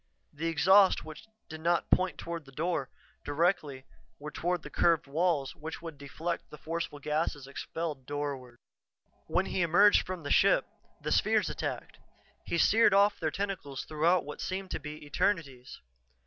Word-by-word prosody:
The 160 +3 -3
exhausts 185 +5 +5
which 155 +8 -11 0.2
did 160 0 -9
not 170 +1 +1
point 185 0 +2
toward 170 -2 -6
the 135 - -14
door, 150 -2 -2 0.3
directly, 145 -3 0 0.3
were 150 +1 -7
toward 175 +1 -2
the - - -9
curved 165 -2 +3
walls 150 -1 0
which 160 +2 -7
would 165 -4 -9
deflect 165 +4 -4
the 150 - -10
forceful 165 0 -4
gasses 150 -1 -2
expelled 140 0 -5
doorward. 140 -4 -4 0.7
When - - +1
he 185 - -1
emerged 180 +5 +5
from 185 -3 -6
the 145 - -4
ship, - - +4 0.4
the - - -2
spheres - - +2
attacked. - - -5 0.4
He 170 - -2
seared 215 +3 +5
off 200 +1 +4
their 160 - 0
tentacles 185 -7 -4
throughout 160 +2 +2
what 150 - -7
seemed 190 0 -4
to - - -2
be 150 0 -8
eternities. 145 -6 -2
160 Hz, 160 wpm, -30 LUFS, 145-175 Hz, 0.7 s, exhausts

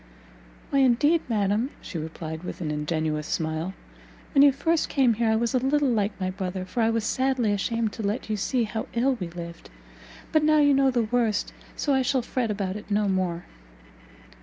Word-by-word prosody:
"Why 275 - +3
indeed, 280 +6 +4
madam," 210 +3 +1
she 170 - -6
replied, 160 0 -6
with - - -6
an 160 -4 -3
ingenuous 150 0 -2
smile, 160 +3 -2 0.6
"when 275 - +6
you 285 0 +8
first 325 +4 0
came 265 -5 +3
here 225 +1 0
I 220 - +3
was 230 +1 0
a 255 - +3
little 280 +2 +2
like 205 -2 0
my 185 -1 -1
brother, 185 -1 -4
for 230 +6 -2
I 225 - +3
was 230 -1 0
sadly 260 -2 +1
ashamed 225 +1 -1
to 225 - -6
let 210 +3 -2
you 215 - -1
see 235 +4 0
how 220 0 -4
ill 260 +3 +3
we 180 - -3
lived! 170 -1 -9 0.6
but 310 - +4
now 310 0 +4
you 290 -1 +5
know 270 0 +4
the 245 -2 +1
worst, 225 -1 0 0.2
so 285 - 0
I 265 - +3
shall 260 -1 +1
fret 245 -1 -2
about 200 -2 -2
it 210 - -11
no 205 0 +1
more." 185 -3 -1
220 Hz, 200 wpm, -26 LUFS, 185-260 Hz, 0.6 s, you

